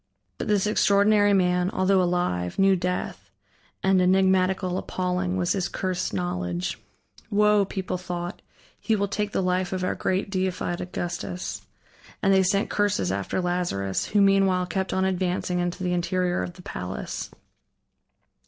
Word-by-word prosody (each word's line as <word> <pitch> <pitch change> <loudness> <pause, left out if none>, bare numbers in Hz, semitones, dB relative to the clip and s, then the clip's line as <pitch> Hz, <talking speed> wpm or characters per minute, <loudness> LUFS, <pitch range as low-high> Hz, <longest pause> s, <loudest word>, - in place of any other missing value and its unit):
But - - -3
this 210 -2 +2
extraordinary 205 0 +4
man, 180 -2 +2
although 190 0 +2
alive, 175 - -1
knew 195 0 +5
Death, 180 - -3 0.5
and 190 -1 +4
enigmatical, 185 0 +2
appalling, 180 0 -2
was 175 -1 0
his 190 -3 0
cursed 185 -2 -2
knowledge. 90 -6 -3 0.5
"Woe," 210 -1 +4
people 190 -2 -4
thought, 175 +1 -5 0.4
"he 225 - +1
will 200 -1 0
take 205 +1 -2
the 190 - 0
life 180 0 0
of 185 -1 -2
our 185 - 0
great, 190 +1 -1
deified 185 -2 -1
Augustus," 175 0 -5 0.6
and 195 -1 +4
they 190 - +5
sent 195 +2 +1
curses 195 - +1
after 100 - -2
Lazarus, 175 - -1
who 205 - +2
meanwhile 195 -2 +3
kept 190 +1 -2
on 190 0 +1
advancing 180 -1 -1
into 175 +1 -2
the 180 -1 0
interior 180 0 0
of 175 - -4
the 180 - -14
palace. 90 - -5
185 Hz, 145 wpm, -25 LUFS, 175-195 Hz, 0.6 s, knew